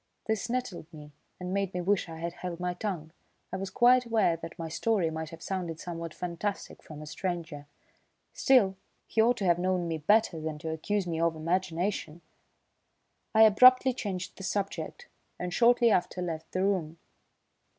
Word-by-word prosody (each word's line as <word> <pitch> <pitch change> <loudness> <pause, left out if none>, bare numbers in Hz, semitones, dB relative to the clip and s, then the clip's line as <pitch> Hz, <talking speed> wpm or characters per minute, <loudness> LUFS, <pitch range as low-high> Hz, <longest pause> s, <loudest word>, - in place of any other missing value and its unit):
This 220 +1 -1
nettled 235 -10 -3
me 150 -2 -12 0.3
and 180 0 -4
made 195 -2 -1
me 180 - -1
wish 190 -1 +1
I 160 - -7
had 170 +1 -4
held 175 -1 -6
my 180 0 -1
tongue. 175 -5 -4 0.4
I - - -1
was 195 0 -4
quite 250 +4 +5
aware 220 -7 +2
that 165 0 -9
my 165 - -4
story 170 +1 0
might 160 0 -5
have 165 0 -11
sounded 175 -4 -3
somewhat 170 -1 -6
fantastic 180 +4 -4
from 155 -1 -10
a - - -8
stranger; 165 -3 -4 0.7
still, 205 -8 +4 0.3
he 225 - +1
ought 240 +2 +3
to 200 - -2
have 175 -1 +3
known 180 -1 0
me 165 -1 -2
better 195 0 +2
than 155 -1 -4
to 160 +1 -5
accuse 195 +5 -1
me 165 -2 -3
of 165 -1 +2
imagination. 175 0 -2 1.1
I 220 - +8
abruptly 255 +4 +7
changed 190 -6 -5
the 195 - -8
subject, 200 - -3 0.3
and 180 0 -4
shortly 235 +2 +5
after 180 -1 +1
left 160 -2 -5
the 185 - 0
room. 175 -5 0
180 Hz, 175 wpm, -29 LUFS, 165-205 Hz, 1.1 s, I